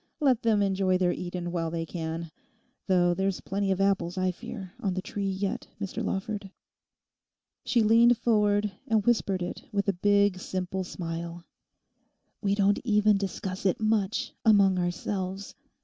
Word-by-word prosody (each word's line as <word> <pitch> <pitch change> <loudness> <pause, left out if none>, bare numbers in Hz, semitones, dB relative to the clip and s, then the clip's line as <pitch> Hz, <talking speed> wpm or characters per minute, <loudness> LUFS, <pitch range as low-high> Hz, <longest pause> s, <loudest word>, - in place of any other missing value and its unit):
Let 260 -6 +3
them 215 -3 +3
enjoy 190 -1 +2
their 180 -1 +2
Eden 175 -1 -4
while 165 -2 -1
they 165 0 -3
can; 165 0 -5 0.6
though 175 -2 +3
there's 190 +1 -1
plenty 195 0 -2
of 190 - 0
apples, 195 -3 +1
I 185 0 +1
fear, 195 -2 -8
on 190 -3 -1
the 185 - -1
Tree 200 -1 -3
yet, 195 +1 -3
Mr 195 -2 -4
Lawford.' 200 0 -3 1.2
She 240 -2 +3
leant 230 +2 +5
forward 210 -3 +2 0.2
and 220 -4 +2
whispered 200 -6 +1
it 175 - -5
with 200 0 -1
a 200 - +3
big, 200 +1 +3
simple 185 0 -3
smile:—'We 170 +3 -7
don't 200 0 +3
even 210 -3 +3
discuss 190 -1 -4
it 185 - +1
much 215 -1 0
among 200 -4 +5
ourselves. 185 +2 -3
195 Hz, 150 wpm, -28 LUFS, 180-205 Hz, 1.2 s, leant